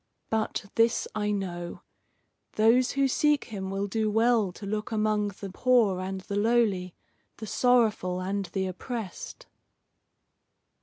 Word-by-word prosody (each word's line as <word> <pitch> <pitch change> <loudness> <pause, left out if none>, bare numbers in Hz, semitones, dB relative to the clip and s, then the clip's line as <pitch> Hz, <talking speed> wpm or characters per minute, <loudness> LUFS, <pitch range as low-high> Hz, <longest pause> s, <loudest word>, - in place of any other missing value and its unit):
But 220 -2 -1
this 230 0 +2
I 210 -1 -1
know. 175 -4 -4 0.7
Those 230 +4 +4
who 275 0 +2
seek 295 +2 +2
him 195 -4 -6
will 195 +1 -2
do 215 +2 -1
well 225 -2 +3
to 200 - -9
look 210 +3 -3
among 215 -1 +1
the 200 -1 -7
poor 225 -4 +3
and 190 +1 -4
the 200 - -5
lowly, 205 -5 +1 0.4
the 220 - -7
sorrowful 220 -6 +2
and 195 +2 -2
the 190 +2 -2
oppressed." 190 +2 -6
210 Hz, 135 wpm, -27 LUFS, 190-230 Hz, 0.7 s, Those